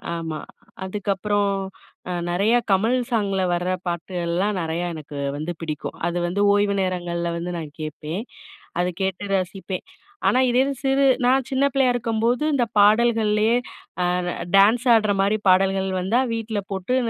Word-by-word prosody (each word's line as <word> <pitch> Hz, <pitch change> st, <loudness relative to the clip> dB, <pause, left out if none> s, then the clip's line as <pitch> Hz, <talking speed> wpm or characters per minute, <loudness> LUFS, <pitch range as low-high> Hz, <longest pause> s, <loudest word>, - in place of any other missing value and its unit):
ஆமா. 160 Hz, -2 st, -4 dB, 0.4 s
அதுக்கப்புறம் 200 Hz, +1 st, -1 dB, 0.6 s
அ -, -, -2 dB, 0.2 s
நெறையா 215 Hz, +7 st, +3 dB
கமல் 220 Hz, +6 st, +3 dB
சாங்ல 200 Hz, -4 st, 0 dB
வர 175 Hz, +1 st, -2 dB, 0.2 s
பாட்டு, 170 Hz, +2 st, -4 dB
எல்லாம் 190 Hz, +4 st, 0 dB
நறையா 165 Hz, +2 st, -2 dB
எனக்கு 150 Hz, -2 st, -9 dB, 0.2 s
வந்து 155 Hz, +4 st, -3 dB
பிடிக்கும். 155 Hz, -2 st, -5 dB
அது 175 Hz, 0 st, -2 dB
வந்து 195 Hz, +4 st, -1 dB
ஓய்வு 205 Hz, 0 st, +2 dB
நேரங்கள்ல 175 Hz, -2 st, -2 dB
வந்து 175 Hz, +1 st, -4 dB
நான் 150 Hz, -2 st, -8 dB
கேட்பேன். 155 Hz, +6 st, -5 dB, 0.6 s
அத 180 Hz, -, +2 dB
கேட்டு 190 Hz, 0 st, -2 dB
ரசிப்பேன். 185 Hz, 0 st, -4 dB, 0.4 s
ஆனா, 255 Hz, -, +4 dB
இதே 245 Hz, +1 st, +2 dB
இது 280 Hz, -, -1 dB
சிறு 270 Hz, +1 st, +2 dB, 0.2 s
நான் 260 Hz, 0 st, +3 dB
சின்ன 270 Hz, +1 st, +2 dB
பிள்ளையா 265 Hz, -2 st, +3 dB
இருக்கும்போது, 235 Hz, +2 st, 0 dB
இந்த 255 Hz, -4 st, +2 dB
பாடல்கள்லயே 215 Hz, 0 st, +4 dB, 0.5 s
அ -, -, +1 dB, 0.5 s
டான்ஸ் 220 Hz, +5 st, +5 dB
ஆடுற 215 Hz, -2 st, +3 dB
மாரி 205 Hz, +2 st, +2 dB
பாடல்கள் 190 Hz, +1 st, +3 dB
வந்தா 195 Hz, +7 st, +1 dB
வீட்ல 225 Hz, -2 st, -2 dB
போட்டு 195 Hz, +6 st, -1 dB
200 Hz, 145 wpm, -23 LUFS, 175-225 Hz, 0.6 s, டான்ஸ்